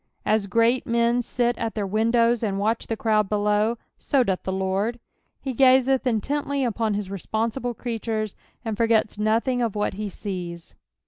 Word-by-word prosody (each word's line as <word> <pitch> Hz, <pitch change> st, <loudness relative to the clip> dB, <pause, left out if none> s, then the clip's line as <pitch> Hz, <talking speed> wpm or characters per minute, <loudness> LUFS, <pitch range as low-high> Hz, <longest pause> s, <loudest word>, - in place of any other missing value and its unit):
Os 215 Hz, -2 st, +2 dB
great 230 Hz, +6 st, +2 dB
men 235 Hz, +1 st, +2 dB
sit 240 Hz, 0 st, 0 dB
at 230 Hz, -1 st, -2 dB
their 210 Hz, -2 st, -1 dB
windows 230 Hz, +3 st, +2 dB
and 200 Hz, -4 st, -1 dB
watch 220 Hz, +3 st, 0 dB
the 225 Hz, -, -2 dB
crowd 215 Hz, -3 st, +2 dB
below, 210 Hz, +2 st, +1 dB, 0.2 s
so 275 Hz, -3 st, +2 dB
doth 190 Hz, -5 st, -1 dB
the 190 Hz, -, -3 dB
Lord^ 190 Hz, +5 st, -1 dB, 0.4 s
he 265 Hz, -, -4 dB
gazeth 260 Hz, +1 st, +4 dB
intently 280 Hz, +4 st, 0 dB
upon 225 Hz, -3 st, 0 dB
his 205 Hz, -2 st, -3 dB
reapnnsible 225 Hz, +5 st, -2 dB
creatures, 225 Hz, -3 st, -3 dB, 0.3 s
and 220 Hz, -1 st, -2 dB
forgets 225 Hz, -2 st, +2 dB
nothing 230 Hz, +4 st, +1 dB
of 230 Hz, -4 st, -1 dB
what 205 Hz, -1 st, 0 dB
he 205 Hz, +1 st, -4 dB
sees. 175 Hz, -4 st, -6 dB
225 Hz, 165 wpm, -24 LUFS, 210-240 Hz, 0.4 s, gazeth